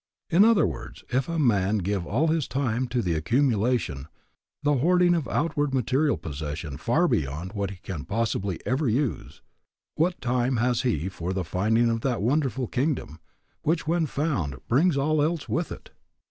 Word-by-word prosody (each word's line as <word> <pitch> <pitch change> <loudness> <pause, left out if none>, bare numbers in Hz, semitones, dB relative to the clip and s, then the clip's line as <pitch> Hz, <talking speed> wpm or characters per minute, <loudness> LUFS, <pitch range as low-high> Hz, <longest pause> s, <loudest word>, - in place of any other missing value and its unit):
In 175 +5 +6
other 225 -1 +5
words, 75 - -6
if 130 +3 0
a 170 - -2
man 105 -8 +2
give 95 -2 -2
all 145 +10 +1
his 160 -3 +1
time 130 -2 -1
to 120 -1 -1
the 85 - 0
accumulation, 110 - +1 0.6
the 145 -1 +3
hoarding 175 +5 +4
of 160 -7 -1
outward 145 -2 0
material 135 +4 +1
possessions 75 0 -6
far 165 - +2
beyond 80 - -2
what 100 -3 -2
he 100 - -7
can 80 -9 -5
possibly 100 -5 -1
ever 130 +1 +1
use, 125 0 -2 0.5
what 175 +3 0
time 125 +1 0
has 120 +1 +1
he 95 - 0
for 90 -1 -4
the 95 -1 -1
finding 110 +8 +2
of 115 0 -1
that 125 -5 -1
wonderful 130 -1 +1
kingdom, 125 - -2 0.4
which 160 +1 0
when 165 0 +1
found, 135 - -1
brings 150 +5 +3
all 150 +2 +2
else 160 0 0
with 165 0 -1
it. - - -9
125 Hz, 170 wpm, -26 LUFS, 95-150 Hz, 0.6 s, In